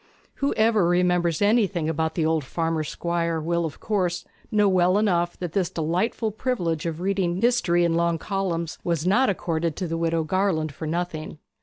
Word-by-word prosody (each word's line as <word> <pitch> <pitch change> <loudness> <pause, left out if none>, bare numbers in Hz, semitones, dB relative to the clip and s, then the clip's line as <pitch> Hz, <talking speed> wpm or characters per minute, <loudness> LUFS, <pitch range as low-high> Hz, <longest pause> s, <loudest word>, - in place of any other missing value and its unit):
Whoever 220 -8 +2
remembers 175 -1 +2
anything 205 -6 +2
about 160 0 -1
the 165 - +1
old 160 -1 +1
farmer 165 +3 -1
squire 170 +1 -2
will, 170 +2 0
of 155 - -6
course, 180 -5 -1 0.2
know 210 -1 +3
well 185 0 +3
enough 175 -5 +1
that 175 -3 -4
this 185 -1 0
delightful 180 +7 -1
privilege 180 -9 -2
of 165 0 -4
reading 190 -2 0
history 195 -7 +2
in 170 - +1
long 170 0 +1
columns 170 -3 -3
was 170 -2 -1
not 245 +8 +3
accorded 165 -4 -1
to 185 - -3
the 165 0 -2
Widow 165 -1 +1
Garland 160 -3 0
for 155 +2 -6
nothing. 160 -2 -3
175 Hz, 170 wpm, -24 LUFS, 165-195 Hz, 0.2 s, know